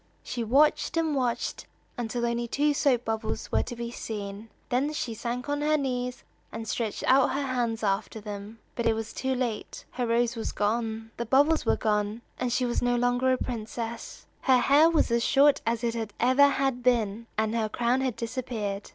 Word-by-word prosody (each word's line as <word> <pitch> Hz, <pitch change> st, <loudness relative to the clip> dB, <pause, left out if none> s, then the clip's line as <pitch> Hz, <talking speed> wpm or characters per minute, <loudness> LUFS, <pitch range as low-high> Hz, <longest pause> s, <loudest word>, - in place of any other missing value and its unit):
She 240 Hz, -, -3 dB
watched 290 Hz, +8 st, +3 dB
and 320 Hz, -2 st, +1 dB
watched 250 Hz, -4 st, -2 dB, 0.3 s
until 240 Hz, 0 st, -2 dB
only 235 Hz, 0 st, -1 dB
two 295 Hz, +5 st, +1 dB
soap 255 Hz, -4 st, +2 dB
bubbles 220 Hz, 0 st, -3 dB
were -, -, +3 dB
to 240 Hz, -, -6 dB
be 235 Hz, 0 st, -5 dB
seen; 210 Hz, -1 st, -6 dB, 0.2 s
then 265 Hz, +5 st, +1 dB
she 245 Hz, -6 st, -3 dB
sank 240 Hz, +3 st, -4 dB
on 290 Hz, 0 st, -1 dB
her 305 Hz, +1 st, +3 dB
knees, 250 Hz, -3 st, -3 dB, 0.3 s
and 225 Hz, 0 st, -6 dB
stretched 215 Hz, 0 st, -2 dB
out 260 Hz, 0 st, +5 dB
her 280 Hz, +1 st, -1 dB
hands 240 Hz, -4 st, -1 dB
after 205 Hz, +2 st, -1 dB
them. 205 Hz, +1 st, -7 dB, 0.2 s
But 235 Hz, -, -1 dB
it 225 Hz, -, +4 dB
was 225 Hz, 0 st, -5 dB
too 265 Hz, 0 st, -1 dB
late; 240 Hz, -4 st, -4 dB
her 245 Hz, -2 st, -2 dB
rose 235 Hz, +1 st, +1 dB
was 225 Hz, -, -4 dB
gone, 225 Hz, +1 st, -1 dB
the 235 Hz, -, -2 dB
bubbles 290 Hz, +6 st, +3 dB
were -, -, +3 dB
gone, 210 Hz, +1 st, -1 dB, 0.2 s
and 250 Hz, -1 st, -1 dB
she 250 Hz, +1 st, +1 dB
was 240 Hz, -, 0 dB
no 245 Hz, 0 st, +2 dB
longer 245 Hz, +1 st, +2 dB
a 255 Hz, -, +2 dB
princess. 230 Hz, -1 st, -5 dB, 0.2 s
Her 260 Hz, -2 st, +5 dB
hair 285 Hz, +6 st, +5 dB
was 325 Hz, -7 st, +2 dB
as 235 Hz, 0 st, +2 dB
short 285 Hz, +1 st, +4 dB
as 230 Hz, 0 st, 0 dB
it 230 Hz, -3 st, -2 dB
ever 260 Hz, +4 st, +5 dB
had 270 Hz, -2 st, 0 dB
been, 230 Hz, -3 st, +1 dB
and 220 Hz, 0 st, +1 dB
her 225 Hz, -2 st, 0 dB
crown 240 Hz, +3 st, +1 dB
had 260 Hz, -4 st, -1 dB
disappeared. 225 Hz, -4 st, -4 dB
240 Hz, 195 wpm, -27 LUFS, 225-260 Hz, 0.3 s, out